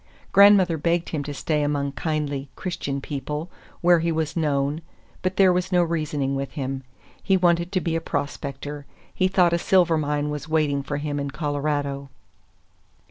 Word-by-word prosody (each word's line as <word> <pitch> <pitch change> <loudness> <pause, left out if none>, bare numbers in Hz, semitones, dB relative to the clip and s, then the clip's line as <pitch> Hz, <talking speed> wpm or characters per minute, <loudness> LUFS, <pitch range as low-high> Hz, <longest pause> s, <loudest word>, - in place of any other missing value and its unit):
Grandmother 195 -5 +6
begged 170 +2 0
him 150 -3 -2
to 145 - -4
stay 150 +2 -1
among 145 -1 0
kindly, 145 -1 -2
Christian 140 -6 -4
people, 150 +4 -5 0.3
where 175 0 +5
he 165 +1 0
was 160 -1 -2
known; 145 -1 0 0.4
but 185 0 -1
there 190 -2 +6
was 180 +1 -1
no 180 -1 +4
reasoning 155 -5 -1
with 135 0 -4
him. 135 -1 -3 0.4
He 195 -1 +3
wanted 170 -1 +2
to 185 -2 0
be 165 -1 -1
a 165 - 0
prospector. 145 -1 -4 0.3
He 185 - +2
thought 180 -2 +3
a 170 - +2
silver 175 -3 +3
mine 150 0 -1
was 150 +1 -5
waiting 150 -3 +1
for 145 +1 -4
him 145 0 -3
in 140 0 -3
Colorado. 145 -1 -2
150 Hz, 170 wpm, -24 LUFS, 145-170 Hz, 0.4 s, Grandmother